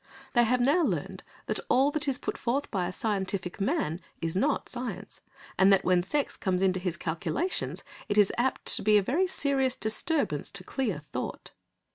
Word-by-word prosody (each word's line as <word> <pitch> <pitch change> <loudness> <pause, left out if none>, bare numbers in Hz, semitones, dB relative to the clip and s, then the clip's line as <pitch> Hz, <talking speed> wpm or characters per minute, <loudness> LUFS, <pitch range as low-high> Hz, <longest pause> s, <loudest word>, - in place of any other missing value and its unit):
They 240 -1 +5
have 250 +2 +2
now 285 +8 +4
learned 190 - -2 0.2
that 215 - -1
all 270 +3 +4
that 295 -1 -1
is 270 -2 +2
put - - -4
forth 265 +4 -2
by 185 -4 0
a - - -3
scientific 195 -2 -2
man 195 - 0 0.2
is 165 0 -3
not 275 +9 +1
science, 230 -6 -6 0.4
and 190 +1 +6
that 195 - +4
when 180 -1 +4
sex 280 +10 -1
comes 190 -2 0
into 185 -1 +2
his 180 -2 -2
calculations 170 - -2 0.3
it 205 - 0
is 205 -2 +5
apt 255 +2 0
to - - -3
be 210 +1 +5
a 205 - +3
very 335 - +1
serious 270 -7 +1
disturbance 280 +8 -1
to - - -5
clear 245 - -2
thought. 145 0 -6
215 Hz, 185 wpm, -28 LUFS, 185-270 Hz, 0.4 s, and